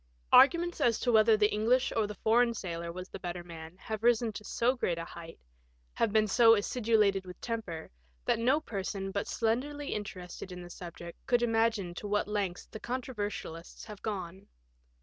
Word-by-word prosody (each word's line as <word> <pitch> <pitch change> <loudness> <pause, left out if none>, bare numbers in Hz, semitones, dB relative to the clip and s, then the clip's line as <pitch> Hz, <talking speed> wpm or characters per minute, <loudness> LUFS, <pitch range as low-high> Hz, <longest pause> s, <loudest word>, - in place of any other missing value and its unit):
Arguments 340 +4 +5
as 230 -2 +3
to 245 - +2
whether 220 0 +6
the 210 0 +3
English 235 +5 +2
or 220 -2 +2
the 210 - -7
foreign 235 +2 +3
sailor 170 -4 -4
was 185 +2 -7
the - - -8
better 175 -1 -5
man 165 0 -10
have 220 +2 -5
risen 235 -1 +3
to 210 - -7
so 240 +4 +1
great 175 -9 -1
a 165 - -4
height, 165 -1 -10 0.6
have 225 - +1
been 215 0 +4
so 225 +2 +6
acidulated 210 -3 +2
with 180 -1 -11
temper, 215 -9 -5 0.3
that - - +2
no 260 +6 +3
person 195 -6 -4
but 200 - -2
slenderly 275 +6 -1
interested 185 -3 -6
in 180 0 -7
the 175 - -10
subject 170 -1 -9
could 245 -1 +3
imagine 225 -5 +1
to 205 - -6
what 205 0 0
lengths 200 -4 -2
the 220 - -10
controversialists 210 -9 -5
have 210 -2 -10
gone. 190 -3 -5
210 Hz, 180 wpm, -31 LUFS, 180-230 Hz, 0.6 s, whether